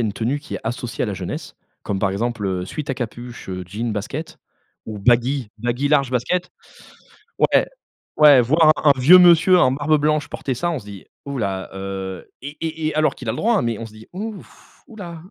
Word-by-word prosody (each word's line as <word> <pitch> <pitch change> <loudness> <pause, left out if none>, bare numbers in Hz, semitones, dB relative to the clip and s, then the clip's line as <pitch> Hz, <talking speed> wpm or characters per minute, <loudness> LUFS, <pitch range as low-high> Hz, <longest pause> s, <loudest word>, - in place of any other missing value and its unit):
a - - +1
une 105 - -2
tenue 120 +7 -1
qui 150 - -9
est - - -4
associée 120 +1 -4
à - - 0
la 105 - -3
jeunesse, 90 -1 -6 0.3
comme 100 -2 -3
par 95 -1 +1
exemple, 110 +1 -2
heu, 90 -1 -2
sweat 145 +9 -6
à - - -1
capuche, 120 -2 -7
heu, 90 0 -4
jeans, 110 +4 -3
baskets 135 +10 -5 0.5
ou 110 -2 -6
baggy 120 +2 +2
baggy 120 +5 -1
large, 140 -3 +2
baskets, 150 +9 -1 0.9
ouais. - - +3 0.5
Ouais, 145 -4 +8
voir 155 +5 +5
un 150 - +3
un 130 - -6
vieux 160 +9 +8
monsieur 180 +1 +6
en 130 -7 +4
barbe 150 +3 +2
blanche 150 -1 +1
porter 135 - -4
ça, 175 +8 -1
on 160 - -2
se 100 - -12
dit: 100 -2 -11 0.2
«Hou 140 -1 -4
là, 95 -4 -3
heu» 95 -1 -6
et 140 - -5
et 160 -1 -2
et 155 - -4
alors 155 0 +2
qu'il 125 - -9
a 110 - +1
le - - -5
droit, 235 +1 +1
hein, - - +1
mais 115 -2 -2
on 115 - -6
se 110 - -14
dit: 110 0 -14
«Ouf, 210 +2 -9
hou 225 - -14
là». 170 -5 -8
125 Hz, 225 wpm, -21 LUFS, 110-155 Hz, 0.9 s, Ouais